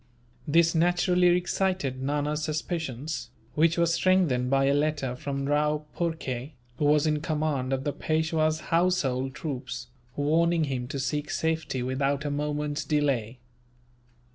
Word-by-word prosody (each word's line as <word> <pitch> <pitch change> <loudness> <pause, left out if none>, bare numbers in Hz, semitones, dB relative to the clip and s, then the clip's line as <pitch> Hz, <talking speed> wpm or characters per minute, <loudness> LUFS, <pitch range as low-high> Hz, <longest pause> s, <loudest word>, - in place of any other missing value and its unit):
This 165 +2 +4
naturally 175 +1 +3
excited 180 -7 -1
Nana's 145 +2 -1
suspicions, 150 -5 -3 0.2
which 165 +2 +3
were 170 - +4
strengthened 170 -7 +2
by 135 0 +3
a 140 - +3
letter 145 -3 0
from 140 +1 -3
Rao 150 +1 +1
Phurkay, 150 -5 -3 0.3
who 150 - +1
was 150 +1 +4
in 150 -1 +1
command 150 -4 -1
of 135 0 -1
the 145 - -1
Peishwa's 155 0 0
household 135 -7 +1
troops, 125 -4 -5 0.3
warning 165 +3 +2
him 130 -4 -2
to 140 - -4
seek 145 +3 -2
safety 160 -5 -1
without 135 +3 -1
a 145 - -1
moment's 150 0 -2
delay. 135 -6 0
150 Hz, 135 wpm, -27 LUFS, 135-160 Hz, 0.3 s, This